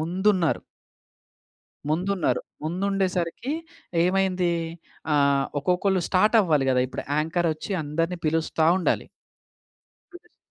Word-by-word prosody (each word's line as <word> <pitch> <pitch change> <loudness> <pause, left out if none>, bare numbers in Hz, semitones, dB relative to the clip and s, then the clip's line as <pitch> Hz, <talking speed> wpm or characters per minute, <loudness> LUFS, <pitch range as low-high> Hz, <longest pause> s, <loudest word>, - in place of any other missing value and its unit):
ముందున్నారు... 180 +1 +1 1.3
ముందున్నారు. 180 +2 0 0.2
ముందుండేసరికి 185 - -1 0.5
ఏమైందీ? 185 -1 +1 0.6
ఆహ్, 140 -1 +3
ఒక్కొక్కళ్ళు 180 +4 +1
స్టార్టవ్వాలి 185 - +3
గదా 125 -1 +3
ఇప్పుడె. - - -6
యాంకరొచ్చి 160 +3 -1
అందరిని 165 +4 -1
పిలుస్తా 160 0 +1
ఉండాలి. 185 - 0 1.1
పిలుస్త 355 - -16
175 Hz, 80 wpm, -25 LUFS, 155-190 Hz, 1.3 s, ఆహ్